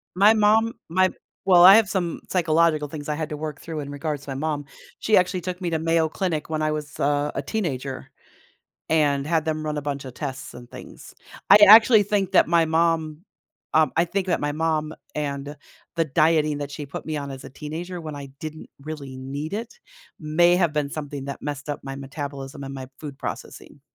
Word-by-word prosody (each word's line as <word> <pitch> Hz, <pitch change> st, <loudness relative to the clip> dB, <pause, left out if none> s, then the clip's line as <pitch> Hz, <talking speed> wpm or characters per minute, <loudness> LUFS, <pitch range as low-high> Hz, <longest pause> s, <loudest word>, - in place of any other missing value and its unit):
My 205 Hz, +4 st, +6 dB
mom 220 Hz, +1 st, +3 dB, 0.2 s
my 185 Hz, +3 st, +3 dB, 0.4 s
well, 180 Hz, -2 st, +7 dB
I 190 Hz, +2 st, +11 dB
have 220 Hz, -3 st, +4 dB
some 180 Hz, -4 st, -2 dB
psychological 165 Hz, -3 st, +2 dB
things 145 Hz, 0 st, -7 dB
I 150 Hz, -, 0 dB
had 155 Hz, 0 st, -4 dB
to 150 Hz, -, -5 dB
work 150 Hz, -1 st, -5 dB
through 160 Hz, -2 st, -6 dB
in 140 Hz, -1 st, -6 dB
regards 145 Hz, 0 st, -4 dB
to 145 Hz, -, -11 dB
my 135 Hz, -, -4 dB
mom. 145 Hz, 0 st, -2 dB, 0.3 s
She 215 Hz, -, +3 dB
actually 180 Hz, 0 st, +1 dB
took 180 Hz, +1 st, -5 dB
me 175 Hz, -, -1 dB
to 160 Hz, -, 0 dB
Mayo 165 Hz, 0 st, +2 dB
Clinic 160 Hz, -1 st, -2 dB
when 155 Hz, -1 st, -2 dB
I 155 Hz, 0 st, +1 dB
was, 150 Hz, -1 st, -6 dB
uh, 145 Hz, +1 st, +1 dB
a -, -, -2 dB
teenager, 135 Hz, -7 st, -4 dB, 0.8 s
and 145 Hz, -3 st, +2 dB
had 160 Hz, -1 st, +1 dB
them 155 Hz, -1 st, -2 dB
run 150 Hz, -1 st, -2 dB
a 150 Hz, -, -3 dB
bunch 140 Hz, -1 st, -4 dB
of 130 Hz, -2 st, -9 dB
tests 135 Hz, -1 st, -6 dB
and 120 Hz, 0 st, -11 dB
things. -, -, -12 dB, 0.4 s
I 200 Hz, -, +10 dB
actually 220 Hz, +1 st, +9 dB
think 200 Hz, -2 st, -1 dB
that 185 Hz, -, +5 dB
my 170 Hz, -1 st, +4 dB
mom, 160 Hz, -1 st, +1 dB, 0.6 s
um, 155 Hz, 0 st, +4 dB
I 165 Hz, -, +4 dB
think 190 Hz, +2 st, -2 dB
that 175 Hz, -, +1 dB
my 145 Hz, -, -1 dB
mom 155 Hz, 0 st, -1 dB, 0.2 s
and 145 Hz, -1 st, -4 dB, 0.4 s
the 165 Hz, -, +2 dB
dieting 155 Hz, 0 st, +2 dB
that 145 Hz, -1 st, -5 dB
she 145 Hz, 0 st, -6 dB
put 140 Hz, -, -8 dB
me 155 Hz, -1 st, -3 dB
on 140 Hz, -1 st, -4 dB
as 135 Hz, -1 st, -8 dB
a 135 Hz, -, -9 dB
teenager, 165 Hz, +6 st, -6 dB
when 155 Hz, -2 st, -7 dB
I 140 Hz, -1 st, -7 dB
didn't 155 Hz, -1 st, -7 dB
really 140 Hz, -3 st, -7 dB
need 140 Hz, +5 st, -6 dB
it, 225 Hz, +3 st, -5 dB, 0.4 s
may 175 Hz, +3 st, +3 dB
have 170 Hz, -4 st, +2 dB
been 145 Hz, -2 st, -1 dB
something 145 Hz, -2 st, -6 dB
that 140 Hz, -, -6 dB
messed 145 Hz, 0 st, -5 dB
up 145 Hz, -, -3 dB
my 135 Hz, 0 st, -5 dB
metabolism 140 Hz, 0 st, -7 dB
and 135 Hz, 0 st, -7 dB
my 130 Hz, -1 st, -7 dB
food 145 Hz, -3 st, -7 dB
processing. -, -, -7 dB
155 Hz, 210 wpm, -24 LUFS, 145-170 Hz, 0.8 s, I